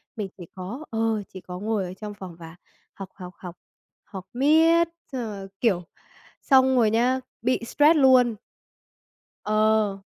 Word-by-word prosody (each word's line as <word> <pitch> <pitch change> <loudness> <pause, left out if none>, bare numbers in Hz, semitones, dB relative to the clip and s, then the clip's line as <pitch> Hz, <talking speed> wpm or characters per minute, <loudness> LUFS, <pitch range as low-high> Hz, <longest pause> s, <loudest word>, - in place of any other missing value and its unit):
Mình 205 -3 -4
chỉ 175 - -9
có 215 +12 -7
ờ, 225 -2 0
chỉ 185 - -10
có 180 0 -8
ngồi 210 -1 -1
ở 180 - -7
trong 210 +1 -8
phòng 185 -4 -10
và 165 +1 -11 0.4
học, 195 -2 -9
học, 180 -1 -10
học, 180 -2 -9 0.5
học 190 -2 -9
miết, 320 +5 +4 0.2
xong 260 -2 -3
rồi, 200 -4 -6
kiểu, 190 -7 +2 0.6
xong 265 -1 +4
rồi 220 -3 +4
nhá 250 +3 +2 0.2
bị 255 +2 +1
stress 300 +6 +4
luôn. 255 -4 +5 1.1
Ờ. 215 -1 +2
215 Hz, 155 wpm, -25 LUFS, 190-255 Hz, 1.1 s, luôn